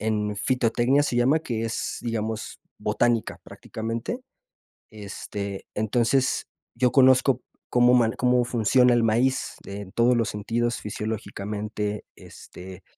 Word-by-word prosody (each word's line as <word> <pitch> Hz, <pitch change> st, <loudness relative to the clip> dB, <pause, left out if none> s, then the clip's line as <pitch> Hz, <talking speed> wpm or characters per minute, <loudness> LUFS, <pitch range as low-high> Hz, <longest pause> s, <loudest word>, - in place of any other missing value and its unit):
en 105 Hz, -1 st, -1 dB
fitotecnia, 125 Hz, +5 st, +2 dB
se 140 Hz, -, -2 dB
llama, 125 Hz, +6 st, +3 dB
que 115 Hz, -8 st, -4 dB
es, 115 Hz, -, -3 dB
digamos, 110 Hz, -1 st, -3 dB, 0.2 s
botánica, 120 Hz, -2 st, 0 dB
prácticamente. 115 Hz, -, -5 dB, 0.7 s
Este, 100 Hz, -1 st, -6 dB
entonces, 120 Hz, +5 st, +1 dB, 0.3 s
yo 125 Hz, +1 st, +2 dB
conozco 130 Hz, -1 st, +5 dB, 0.3 s
cómo 125 Hz, 0 st, +5 dB
man 115 Hz, -2 st, +3 dB
cómo 125 Hz, -1 st, +2 dB
funciona 125 Hz, +1 st, +3 dB
el 120 Hz, -, +3 dB
maíz 120 Hz, +4 st, +1 dB
en 100 Hz, -1 st, -7 dB
todos 120 Hz, +3 st, +3 dB
los 115 Hz, -2 st, +1 dB
sentidos 115 Hz, +3 st, -1 dB
fisiológicamente, 105 Hz, 0 st, -4 dB
este, 90 Hz, 0 st, -12 dB
115 Hz, 115 wpm, -25 LUFS, 105-125 Hz, 0.7 s, conozco